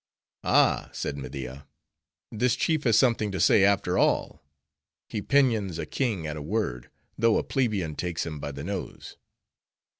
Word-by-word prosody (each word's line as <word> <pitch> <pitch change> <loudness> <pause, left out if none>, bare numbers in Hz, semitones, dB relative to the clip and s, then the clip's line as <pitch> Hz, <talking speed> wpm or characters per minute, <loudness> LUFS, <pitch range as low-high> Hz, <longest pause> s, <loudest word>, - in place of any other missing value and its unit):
"Ah," - - +3
said 70 - -3
Media, 65 0 -7 0.6
"this 120 +3 +1
chief 155 +2 0
has 115 -3 +4
something 115 -4 +2
to 95 - -3
say, 95 - +5
after 95 -2 +2
all; - - +1 0.7
he 105 - -4
pinions 110 - +2
a 80 - -3
king 105 - -2
at 75 -1 -4
a 75 - -6
word, 75 - -3 0.3
though 115 -1 +4
a - - 0
plebeian 105 - -1
takes 85 0 -3
him 75 -2 -6
by 70 - -5
the 70 +1 -7
nose. 95 +2 -6
95 Hz, 155 wpm, -27 LUFS, 75-115 Hz, 0.7 s, say